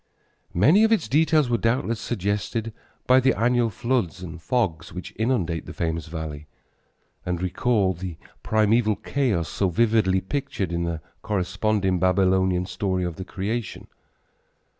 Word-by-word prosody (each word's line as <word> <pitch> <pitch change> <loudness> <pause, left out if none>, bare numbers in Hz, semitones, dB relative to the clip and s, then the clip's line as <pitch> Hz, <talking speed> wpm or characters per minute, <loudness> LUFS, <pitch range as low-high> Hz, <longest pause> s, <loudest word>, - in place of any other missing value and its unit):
Many 150 - +5
of 220 - +4
its 220 -8 +2
details 155 0 +3
were 120 -1 +1
doubtless 115 -1 0
suggested 105 +1 -2 0.3
by 130 +1 +6
the 130 0 +3
annual 120 +1 +2
floods 110 -5 -1
and 85 -1 -8
fogs 85 -9 -1
which 90 +1 -8
inundate 100 - -1
that - - -8
famous 80 -2 -2
valley 80 -2 -6 0.8
and 90 -1 -2
recall 95 +2 +1
the 90 -1 -7 0.2
primeval 110 0 +2
chaos 110 - -1
so 95 - 0
vividly 105 -1 +2
pictured 100 - -3
in 85 0 -1
the 85 -2 -3 0.2
corresponding 100 -1 0
Babylonian 95 0 +2
story 95 0 -2
of 85 -2 -4
the 95 - -5
creation. 105 +3 -4
100 Hz, 140 wpm, -24 LUFS, 90-120 Hz, 0.8 s, by